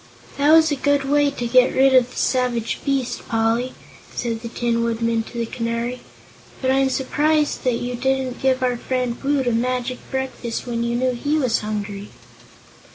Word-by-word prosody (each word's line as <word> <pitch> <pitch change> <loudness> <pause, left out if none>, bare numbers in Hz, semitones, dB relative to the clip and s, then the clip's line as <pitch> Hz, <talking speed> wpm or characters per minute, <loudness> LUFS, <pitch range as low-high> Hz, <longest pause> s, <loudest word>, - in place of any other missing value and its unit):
"That 290 +2 +4
was 320 -1 +6
a - - +2
good 285 +1 +1
way 290 0 +3
to 260 -4 -5
get 250 +2 +4
rid 265 0 +5
of 250 -1 +5
the - - -14
savage 245 -3 0
beast, 270 -3 -2
Poly," 230 +2 0 0.4
said 230 -2 -2
the 235 - -5
Tin 235 0 0
Woodman 230 0 0
to 230 +2 -9
the 235 - 0
Canary; 235 +1 -3 0.6
"but 260 -1 +1
I'm 270 0 +3
surprised 295 +3 +1
that 250 -2 +2
you 245 +1 -3
didn't 260 0 -1
give 260 -1 +2
our 250 -1 +1
friend 250 -1 -2
Woot 280 -1 +1
a 245 - +2
magic 250 +2 -1
breakfast, 260 -3 -4
when 235 -1 -2
you 235 0 -1
knew 255 +1 +1
he 290 +5 0
was 255 -6 +1
hungry." 205 -1 -5
250 Hz, 180 wpm, -21 LUFS, 235-265 Hz, 0.6 s, was